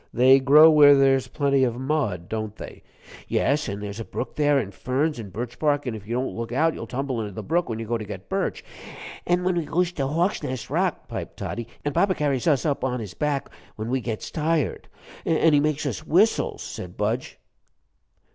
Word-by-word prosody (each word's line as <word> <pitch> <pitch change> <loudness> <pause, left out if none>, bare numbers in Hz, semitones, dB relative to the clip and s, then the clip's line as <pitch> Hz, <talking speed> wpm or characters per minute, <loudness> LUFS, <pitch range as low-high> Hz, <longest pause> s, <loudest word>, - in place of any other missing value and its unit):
They 130 +3 +6
grow 150 +4 +7
where 145 -2 +8
there's 135 -1 +3
plenty 140 -2 +1
of 120 -2 0
mud, 130 - -1
don't 110 0 -4
they?" - - -10 0.5
"Yes, 150 +2 +1
an' 100 +1 -5
there's 105 +1 -6
a - - -3
brook 115 +5 -6
there, 145 -1 +3
an' 110 -8 -2
ferns, 135 - -1
an' 105 -3 -7
birch 120 +5 -6
bark, 145 -2 +1
an' 125 - -2
if 105 -2 -9
you 120 - -2
don't 130 +1 -2
look 115 0 -5
out 160 +6 +2
you'll 115 - -7
tumble 130 -1 -3
into 105 -2 -5
the - - -6
brook 170 0 0
when 110 - -3
you 115 - -5
go 115 +1 -1
to - - -5
get 100 -2 -8
birch." - - -2 0.6
"An' 175 +1 +2
we 180 -2 +1
goes 175 +3 0
to 140 -6 -2
Hawksnest 150 - -2
Rock," - - -1
piped - - -6
Toddie, 120 -1 -5 0.2
"an' 145 - -1
papa 190 +3 +2
carries 140 -3 -1
us 145 -3 +2
up 145 -4 -1
on 125 -1 -1
his 105 -5 -7
back 145 +1 -1 0.3
when 110 +2 -5
we 130 0 0
gets 115 -2 -5
tired." 155 -3 -1 0.4
"An' 165 -1 +3
he 145 - +6
makes 150 0 0
us - - -3
whistles," 185 +8 +2
said - - -8
Budge. - - -2
135 Hz, 210 wpm, -24 LUFS, 115-150 Hz, 0.6 s, where